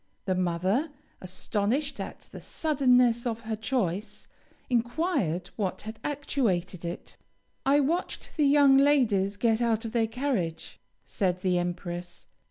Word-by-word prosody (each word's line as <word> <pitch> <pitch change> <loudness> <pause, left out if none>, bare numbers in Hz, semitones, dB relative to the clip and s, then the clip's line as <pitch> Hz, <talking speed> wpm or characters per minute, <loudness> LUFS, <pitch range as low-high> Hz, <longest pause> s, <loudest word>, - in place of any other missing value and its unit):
The 190 - +1
mother, 185 - 0 0.3
astonished 210 +9 -1
at - - -6
the - - -11
suddenness 250 -6 +2
of 230 -1 -3
her 220 -1 -3
choice, 210 -2 -2 0.4
inquired 240 - 0
what 195 -4 -2
had 220 +1 -7
actuated 215 - -1
it. 170 +1 -6 0.5
'I 285 +2 +5
watched 330 +6 -2
the 300 -3 +3
young 280 -1 +6
ladies 230 -9 +3
get 225 +1 +2
out 230 -1 +1
of 225 - -4
their 225 -1 +1
carriage,' 225 - -3 0.3
said 185 -3 -1
the 180 -2 +2
empress. 175 0 -5
225 Hz, 130 wpm, -28 LUFS, 185-270 Hz, 0.5 s, young